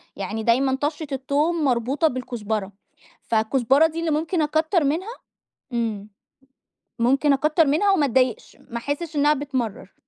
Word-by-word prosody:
يعني 210 +3 -4
دايمًا 260 +3 +2
طشَّة 300 +1 -2
التوم 290 +5 0
مربوطة 260 +5 +1
بالكزبرة، 220 -6 -3 0.5
فالكزبرة 260 +7 +2
دي 325 +1 -6
اللي 330 -1 -1
ممكن 320 +3 0
أكتر 315 +3 +1
منها 340 - -1 0.6
امم، 220 -4 -2 0.9
ممكن 275 +4 +3
أكتر 305 +3 +2
منها 325 +8 +3
وما 315 -7 +3
أتضايقش، 255 -3 0
ما 235 - -4
أحسّش 290 +6 -4
إنها 295 +1 +4
بتمرّر. 260 -9 -4
275 Hz, 130 wpm, -23 LUFS, 235-310 Hz, 0.9 s, إنها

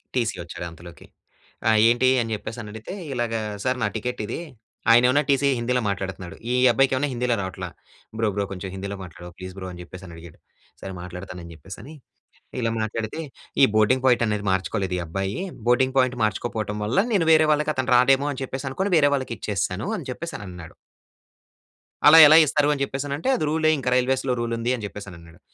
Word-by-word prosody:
TC 115 -5 0
వచ్చాడు 85 +1 -7
అంతలోకి. 85 +1 -13 0.6
"ఆ! - - +6 0.2
ఏంటి?" 120 +2 +3
అని 115 -1 -4
చెప్పేసి 110 +3 -7
అని 105 - -9
అడిగితే 110 - -8 0.2
ఇలాగా, 115 -2 -1 0.2
"సార్ 130 0 0
నా 105 - +2
టికెట్ 125 +2 -4
ఇది". 115 - -4 0.5
ఆయనేమన్నా 125 +5 +5
టీసీ 140 0 +3
హిందీలో 125 +1 0
మాట్లాడుతున్నాడు. 95 -1 -5 0.2
ఈ - - +1 0.2
అబ్బాయికి 135 +3 +3
ఏమన్నా 145 +2 0
హిందీలో 120 0 0
రావట్ల. 95 0 -6 0.5
"బ్రో 110 - +1
బ్రో, 100 -1 0
కొంచెం 95 0 -6
హిందీలో 100 +1 -5
మాట్లాడ‌వ. 90 0 -10
ప్లీజ్ 95 0 -8
బ్రో" 95 - -6
అని 90 - -10
చెప్పేసని 90 -1 -11
అడిగాడు. 85 -1 -13 0.4
సరే 95 - -7
మాట్లాడుతాను 90 0 -8
అని 85 - -10
చెప్పేసి 95 +6 -11
అని 145 - -11 0.7
ఇలా 115 -1 0
మాట్లాడితే 110 +5 -3 0.4
ఈ - - +10
బోర్డింగ్ 110 +5 +3
పాయింట్ 120 -2 +4
అనేది 105 -1 -2
మార్చుకోలేదు 95 0 -1
ఈ - - -2
అబ్బాయి. 95 +4 -3 0.3
బోర్డింగ్ 130 +2 +3
పాయింట్ 130 -1 +2
మార్చుకోకపోవటం 110 -1 -2
వల్ల 115 - 0
నేను 180 -6 +2
వేరే 155 0 +6
వాళ్ళకి 150 0 +1
అతను 130 0 -1
రాడేమో 135 +3 +4
అని 135 - -7
చెప్పేసి 135 +1 -5
అనుకోని 190 +8 -2
వేరే 145 -2 +5
వాళ్ళకి 130 -4 -2
ఇచ్చేసాను 100 0 -2
అని - - -7
చెప్పేసన్నాడు. 95 - -8 1.3
అలా 160 - +9
ఎలా 155 +2 +8
ఇస్తారు? 150 0 +2
అని 140 - -4
చెప్పేసి 135 +1 -3
అంటే 165 - -2
అది 155 - -2
రూ‌లే 155 0 +2
ఇంక 130 -2 -7
రైల్వేస్‌లో 130 0 +1
రూల్ 120 0 -2
ఉంది 120 +2 -1
అని 115 - -8
చెప్పేసని 100 -3 -9
అన్నాడు. 80 -1 -17
115 Hz, 185 wpm, -24 LUFS, 95-130 Hz, 1.3 s, ఈ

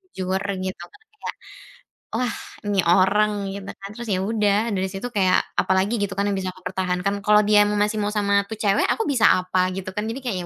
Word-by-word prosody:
jujur 185 0 -1 0.2
gitu, 185 -2 -5
kan 415 - -19 0.2
kayak, - - -5 0.8
"Wah, 245 0 -1 0.3
ini 200 -2 +2
orang." 195 +4 +4 0.2
Gitu 200 0 -8
kan, 195 - -7
terus 235 0 -7
ya 185 - 0
udah, 210 +1 +1
dari 190 0 -1
situ 195 +6 -4
kayak 190 -3 +3 0.2
apalagi 190 +4 +1
gitu 200 -1 -2
kan 200 - +1
yang 195 - -1
bisa 185 -1 -3
aku 185 - -18
pertahankan, 185 +1 -1
kalau 210 0 +5
dia 210 0 +5
mau 210 - -1
masih 210 +1 +1
mau 205 - 0
sama 200 -1 +2
itu 220 - -4
cewek, 200 -1 +3
aku 450 - -1
bisa 230 -4 +4
apa 185 0 +1
gitu 190 -1 -5
kan? 210 - -1
Jadi 250 +4 -4
kayak, 220 -6 -2
200 Hz, 210 wpm, -23 LUFS, 190-210 Hz, 0.8 s, kalau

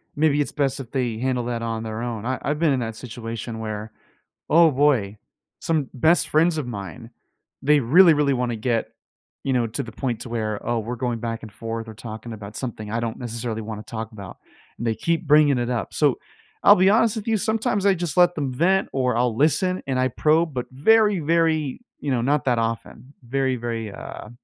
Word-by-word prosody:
maybe 145 -1 +3
it's - - -2
best 135 -2 -1
if 125 -3 -8
they 125 -5 -1
handle 125 -1 -1
that 120 -1 -3
on 115 -1 -3
their 110 0 -5
own. 115 -2 -4
I 130 +1 -1
I've 150 +2 -2
been 160 -4 +3
in 130 - 0
that 115 -2 -4
situation 115 -1 -6
where, 110 0 -5 0.6
oh, 165 0 +6
boy, 130 -8 +2 0.4
some 155 -5 0
best 160 +7 +3
friends 160 +1 +3
of 140 - -3
mine, 115 +2 -7 0.5
they 145 +1 +4
really, 165 +8 +6
really 145 -2 +2
wanna 120 -2 -1
get, 115 0 -1 0.6
you 135 - 0
know, 120 -2 +2
to 110 - -4
the 110 - -9
point 125 -3 -3
to 120 - -7
where, 110 -3 -3
oh, 120 -1 0
we're 120 +3 -5
going 120 -2 -2
back 115 -1 -4
and 110 - -10
forth 115 +1 -5
or 110 - -8
talking 110 +1 -8
about 105 0 -9
something 110 -4 -5
I 115 - 0
don't 115 -1 -3
necessarily 115 -2 -4
wanna 105 0 -6
talk 110 0 -6
about, 100 -3 -9 0.4
and 120 - -4
they 110 - +1
keep 165 +4 -1
bringing 150 -2 +5
it 120 0 -1
up. 115 -7 -3
So, - - +2 0.4
I'll - - +8
be 185 +2 +5
honest 225 +1 +3
with 220 +1 -5
you, 220 - +3
sometimes 210 -1 0
I 195 - +5
just 170 -3 -4
let 175 0 +5
them 140 -4 -2
vent 185 +8 +2
or 125 -3 0
I'll 120 -2 +1
listen 160 +6 +2
and 130 -1 0
I 130 - +2
probe, 155 +5 +2
but 125 -2 -3
very, 210 +6 +4
very, 160 - +1 0.2
you 145 - -3
know, 120 -2 +1
not 140 +1 +1
that 120 -2 +2
often. 115 +3 -4
Very, 130 +1 0
very, 115 -3 -4
uh, 105 - -9
125 Hz, 215 wpm, -23 LUFS, 115-150 Hz, 0.6 s, I'll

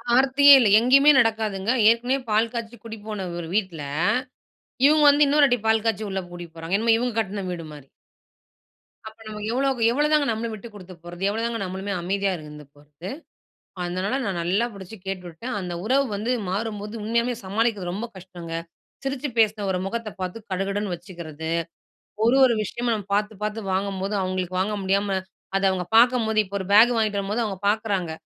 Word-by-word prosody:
ஆர்த்தியே 270 +2 +6
இல்ல. 230 -5 +4
எங்கேயுமே 275 +5 +6
நடக்காதுங்க. 220 -3 +1 0.2
ஏற்கனவே 245 +3 +2
பால் 220 +2 +2
காய்ச்சு 235 0 -5
கூட்டி 225 -1 -7
போன 210 -3 -4
ஒரு 165 - -6
வீட்ல. 185 -7 -1 1.1
இவங்க 305 +1 +5
வந்து 290 +1 +6
இன்னொரு 290 +1 +5
வாட்டி 245 -2 +1
பால் 220 0 +2
காய்ச்சி 220 -1 0
உள்ள 190 0 -2
கூட்டிட்டு 175 -2 -10
போறாங்க. 165 +4 -1
என்னமோ 225 +1 +3
இவங்க 245 -1 -2
கட்ன 200 -2 -4
வீடு 170 -2 -5
மாரி. 145 -3 -12 1.2
அப்ப 220 0 -10
நமக்கு 210 0 -6
எவ்வளோக்கு 265 -1 0
எவ்வளோ 295 +5 +2
தாங்க 300 -1 +4
நம்மளும் 225 0 -2
விட்டுக் 215 +1 -10
குடுத்து 185 -2 -11
போறது? 175 +2 -8
எவ்வளோ 220 +2 -2
தாங்க 235 -1 -2
நம்மளுமே 190 +2 -5
அமைதியா 195 +2 0
இருந்து 150 -1 -11
போறது? 150 +5 -11 0.7
அதனால 185 +8 -2
நான் 195 -4 -2
நல்லா 195 +7 +1
புடிச்சு 200 +1 -10
கேட்டுவிட்டேன். 190 +5 -5
அந்த 180 -2 -5
உறவு 265 +5 +3
வந்து 215 +4 -2 0.2
மாறும்போது, 210 +1 -4
உண்மையாவே 235 +3 0
சமாளிக்கிறது 205 -2 -1
ரொம்ப 210 +6 -4
கஷ்டங்க. 175 -2 -10 0.5
சிரிச்சு 270 +1 -2
பேசுன 215 -2 +3
ஒரு 185 - 0
முகத்த 230 +2 -4
பார்த்து, 185 +3 -4
கடுகடுன்னு 195 +1 -2
வச்சுக்கிறது. 165 -3 -8 0.7
ஒரு 235 +3 +4
ஒரு 245 -2 +4
விஷயமா 240 +3 -3
நம்ம 205 -3 -5
பார்த்துப் 210 0 -2
பார்த்து 210 +1 -2
வாங்கும்போது, 195 +1 -2
அவங்களுக்கு 185 -1 -3
வாங்க 205 +3 0
முடியாம 195 0 +1 0.4
அத 195 - 0
அவங்க 185 -1 -2
பார்க்கும்போது 230 -2 +4
இப்ப 200 -1 -12
ஒரு 190 - -5
பேக் 225 +4 +7
வாங்கிட்டு 215 -2 +1
வரும்போது 205 +4 -1
அவங்க 200 -4 -4
பார்க்குறாங்க. 205 -5 0
210 Hz, 170 wpm, -24 LUFS, 185-230 Hz, 1.2 s, பேக்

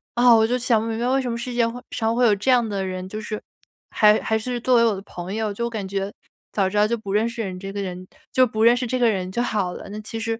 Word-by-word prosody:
啊， 240 0 +6
我 220 0 +4
就 250 +1 +1
想 235 -3 +2
不 225 - -3
明 225 -1 -2
白 240 - 0
为 270 +1 +2
什 250 - -3
么 230 - -3
世 245 +1 -5
界 235 -1 +2
会 245 +2 -6
上 225 0 0
会 245 0 +3
有 215 - +5
这 210 +7 -2
样 240 -3 +3
的 195 -2 -2
人， 185 0 -5
就 215 +1 -5
是 215 0 -5 0.5
还 210 0 +5
还 220 - 0
是 245 +2 -3
作 250 +1 +2
为 230 - +5
我 215 -3 +2
的 190 - -7
朋 180 0 -7
友， 215 -2 -1
就 235 +3 -3
我 - - -2
感 210 -4 -4
觉 195 +1 -3 0.4
早 195 -2 +1
知 205 - -8
道 210 +1 +4
就 235 +1 -1
不 200 -2 -6
认 220 +2 +2
识 230 0 -5
人 185 -2 -5
这 195 0 -6
个 200 0 -4
人 185 -1 -6 0.3
就 255 -1 +5
不 220 0 -1
认 235 +1 +7
识 250 -1 -2
这 255 +2 -1
个 235 -2 +4
人 185 -3 -2
就 240 - -1
好 200 -6 -1
了。 - - -9
那 210 - -6
其 225 +1 -6
实 225 0 -2
220 Hz, 340 characters per minute, -23 LUFS, 200-235 Hz, 0.5 s, 认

